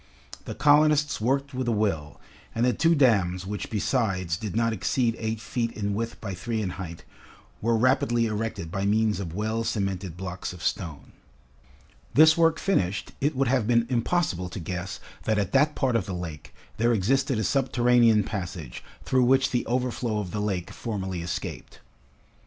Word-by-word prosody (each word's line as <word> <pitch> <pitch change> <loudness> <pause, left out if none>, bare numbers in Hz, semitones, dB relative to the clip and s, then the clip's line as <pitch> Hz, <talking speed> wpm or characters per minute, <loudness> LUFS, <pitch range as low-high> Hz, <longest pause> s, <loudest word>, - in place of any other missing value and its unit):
The - - -6
colonists 150 -2 +4
worked 135 +4 0
with 130 -1 -2
a - - +2
will, 95 - -1 0.4
and 115 - +2
the 125 - +3
two 165 +2 +3
dams 95 - +2
which 100 0 -5
besides 100 -7 0
did 105 +3 -5
not 115 0 +2
exceed 115 +4 0
eight 110 -1 -2
feet 115 +1 -2
in 100 -1 -2
width 115 +3 -3
by 100 -3 -5
three 110 +5 -3
in 100 -4 -2
height, 85 -3 -7 0.6
were 115 +1 +2
rapidly 120 -1 +2
erected 105 -6 -3
by 100 +1 -2
means 105 +1 +2
of 85 -4 -5
well 110 +2 -1
cemented 95 -5 -2
blocks 90 -1 -5
of 90 - -10
stone. 80 -6 -3 1.0
This 155 +1 +7
work 165 -1 +3
finished, 100 - 0
it 145 +2 +1
would 135 +1 +1
have 125 -4 +1
been 115 -1 +3
impossible 120 - 0
to 95 - -6
guess 90 +2 -5 0.3
that 110 -1 +1
at 100 -2 0
that 150 +3 +3
part 130 -3 +1
of 110 -4 0
the 95 - -3
lake, 85 -4 -7 0.3
there 115 +2 +3
existed 130 +5 +1
a 110 - 0
subterranean 120 -4 +3
passage 90 - -6 0.2
through 130 -1 +3
which 135 +1 +3
the 125 - -1
overflow 120 -2 -1
of 100 -4 -3
the 105 - -2
lake 95 -4 -2
formerly 95 -6 -4
escaped. 85 +1 -6
110 Hz, 175 wpm, -26 LUFS, 95-125 Hz, 1.0 s, This